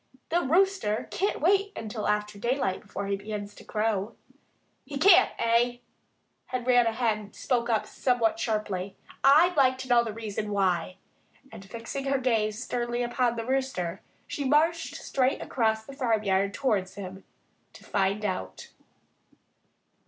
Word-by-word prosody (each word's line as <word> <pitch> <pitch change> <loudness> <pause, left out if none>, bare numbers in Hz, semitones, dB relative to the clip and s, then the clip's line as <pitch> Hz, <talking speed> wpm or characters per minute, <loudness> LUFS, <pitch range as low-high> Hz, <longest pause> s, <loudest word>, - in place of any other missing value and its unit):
The 345 +2 +2
Rooster 340 - +1
can't 395 -4 -1
wait 395 +4 +2
until 215 0 -4
after 210 0 -1
daylight, 235 -5 -1
before 200 -1 -6
he 200 0 0
begins 205 0 -6
to - - -14
crow." 215 0 -1 0.7
"He 280 +1 -6
can't, 365 +4 +7
eh?" 235 +1 +2 0.7
Henrietta 245 -2 +2
Hen 215 -3 -1
spoke 240 -2 -1
up 220 -2 +1
somewhat 235 -4 0
sharply. 210 -4 -2 0.3
"I'd 315 +6 +6
like 260 -3 +4
to 260 0 -7
know 240 -1 +5
the 225 - -4
reason 215 -1 -4
why!" 185 -3 0 0.5
And 220 -3 -10
fixing 230 +6 -6
her 275 0 +2
gaze 225 -3 0
sternly 240 0 -2
upon 240 0 0
the 230 -1 -4
Rooster, 250 -9 -2 0.2
she 285 - -4
marched 320 +4 +2
straight 260 0 0
across 220 -3 0
the 275 - -10
farmyard 210 -7 +1
towards 205 -9 0
him, 190 -1 -8 0.5
to - - -15
find 200 +2 0
out. 185 -2 -4
230 Hz, 140 wpm, -27 LUFS, 210-260 Hz, 0.7 s, can't